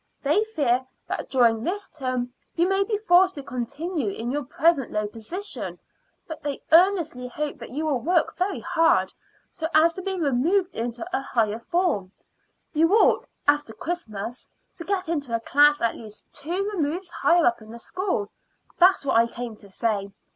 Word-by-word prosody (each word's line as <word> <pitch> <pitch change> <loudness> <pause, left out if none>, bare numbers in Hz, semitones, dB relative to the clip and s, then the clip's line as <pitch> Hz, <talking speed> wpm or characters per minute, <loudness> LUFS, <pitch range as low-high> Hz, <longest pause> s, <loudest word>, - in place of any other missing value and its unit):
They 300 +10 +3
fear 260 - 0 0.2
that - - -4
during 230 -4 +3
this 395 +6 -2
term 255 -3 -3 0.2
you 345 +1 +3
may 390 +1 +2
be 420 +1 -1
forced 375 -2 +4
to 280 - -7
continue 280 - -3
in 230 +5 -4
your 290 +2 -1
present 280 +1 +2
low 210 0 -1
position; 235 - -6 0.5
but 320 -1 -7
they 285 -2 -4
earnestly 330 -7 +4
hope 295 +4 -4
that - - -8
you 300 +5 -3
will 285 -5 +1
work 335 +6 +1
very 375 +2 -1
hard, 330 -2 +2 0.4
so 320 - -3
as 325 +2 +5
to 375 - -6
be 380 0 -3
removed 335 +6 +1
into 235 +4 -4
a - - 0
higher 225 -4 0
form. 290 - 0 0.6
You 325 +2 +3
ought, 445 - +4 0.2
after 290 -6 +2
Christmas, 235 - -5 0.3
to 335 - -6
get 380 -1 -1
into 285 -8 -1
a - - 0
class 290 +3 +4
at 230 - +1
least 215 -2 -10
two 360 +7 -3
removes 345 +1 -2
higher 345 -1 +3
up 235 -1 +2
in 215 - -13
the 230 - -8
school. 360 - -3 0.5
That 370 +2 +7
is - - -14
what 265 - +2
I 230 0 +5
came 235 -1 -6
to 200 - -16
say. 200 -1 -1
295 Hz, 180 wpm, -25 LUFS, 235-350 Hz, 0.6 s, That